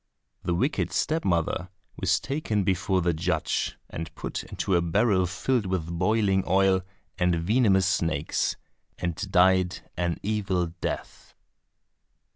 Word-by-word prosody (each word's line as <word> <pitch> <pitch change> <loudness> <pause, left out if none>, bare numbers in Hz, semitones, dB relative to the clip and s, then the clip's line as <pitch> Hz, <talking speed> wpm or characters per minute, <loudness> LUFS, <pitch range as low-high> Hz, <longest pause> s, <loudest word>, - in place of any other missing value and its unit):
The 85 - -1
wicked 130 - 0
step 160 +1 0
mother 90 +1 0 0.3
was 95 +1 +1
taken 110 -4 -1
before 95 0 +1
the 85 0 +2
judge, 80 +1 -1
and 80 0 -6
put - - -4
into 95 - -3
a 85 - +3
barrel 95 +2 +2
filled 105 +5 0
with 90 -3 -1
boiling 95 +2 +2
oil 95 0 +3 0.4
and 90 -1 +3
venomous 95 +2 +3
snakes, 80 -5 0 0.4
and 85 -1 -2 0.2
died 95 0 +3
an 85 -1 -1
evil 95 -5 -1
death. - - -5
95 Hz, 125 wpm, -26 LUFS, 85-100 Hz, 0.4 s, a